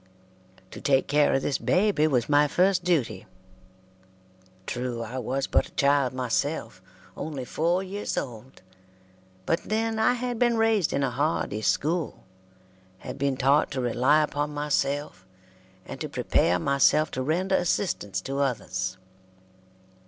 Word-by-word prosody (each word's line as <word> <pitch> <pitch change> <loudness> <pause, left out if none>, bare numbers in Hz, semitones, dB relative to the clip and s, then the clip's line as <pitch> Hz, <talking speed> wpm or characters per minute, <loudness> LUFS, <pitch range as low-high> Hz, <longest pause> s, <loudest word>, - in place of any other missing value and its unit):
To - - -9
take 135 -2 +2
care 150 0 +3
of 135 - 0
this 140 - -1
baby 185 -5 +2
was 125 -6 +1
my 150 0 +4
first 185 +3 +2
duty. 155 - 0 1.4
True, 120 0 -3
I 125 +3 -5
was 130 +3 -2
but - - +1
a - - -20
child 140 -2 +3
myself 125 -2 -2 0.3
only 145 -5 -5
four 170 +7 0
years 200 +2 -4
old 125 +1 -6 0.8
but 165 - 0
then 220 +1 -1
I 220 +2 +4
had 245 -1 -3
been 240 -2 +3
raised 225 -6 +2
in 140 - 0
a 135 - 0
hardy 140 -6 -1
school 160 +7 -1 0.7
had - - -8
been 140 -1 0
taught 140 +3 +3
to 130 - -2
rely 125 +5 +3
upon 145 0 -2
myself, 145 -7 -1 0.6
and - - -9
to - - -3
prepare 90 - +1
myself 140 - +3
to 130 - -3
render 175 +8 0
assistance 165 - 0
to 135 +6 -4
others. 95 -8 -2
145 Hz, 140 wpm, -26 LUFS, 130-175 Hz, 1.4 s, my